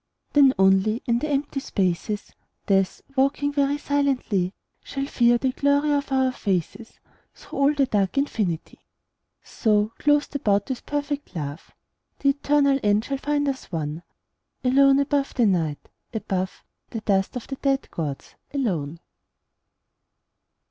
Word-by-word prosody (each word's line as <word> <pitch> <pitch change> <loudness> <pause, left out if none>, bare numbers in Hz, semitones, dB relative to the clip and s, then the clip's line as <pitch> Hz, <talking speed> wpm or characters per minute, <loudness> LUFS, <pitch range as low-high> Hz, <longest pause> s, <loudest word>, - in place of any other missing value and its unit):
Then 280 -2 +7
only 195 +4 +3
in 235 0 +2
the 305 - -3
empty 280 0 -1
spaces, 200 -2 -2 0.3
Death, 195 -1 +1
walking 280 +2 +1
very 285 0 +1
silently, 270 -11 0 0.3
Shall 275 0 -4
fear 240 -3 +3
the 260 +1 0
glory 285 +2 +2
of 285 -1 0
our 265 -1 +2
faces 200 0 -3 0.4
Through - - -8
all 280 +1 +5
the 280 -1 +3
dark 205 -2 0
infinity. 210 - -1 0.6
So, 210 -1 +1
clothed 295 0 +2
about 205 -4 +1
with 255 -2 -5
perfect 290 -4 -3
love, 145 -1 -5 0.5
The 280 - +2
eternal 280 -1 +2
end 205 +2 +2
shall 275 -1 -3
find 290 0 0
us 270 -7 -4
one, 155 -1 -3 0.6
Alone 270 +2 +5
above 280 0 0
the 240 - +3
Night, 165 -7 0 0.3
above 190 -3 -3 0.3
The 225 - -5
dust 195 -1 0
of 250 - -5
the 270 - -6
dead 275 0 0
gods, 145 -5 -5 0.2
alone. 170 - -1
255 Hz, 135 wpm, -24 LUFS, 195-280 Hz, 0.6 s, Then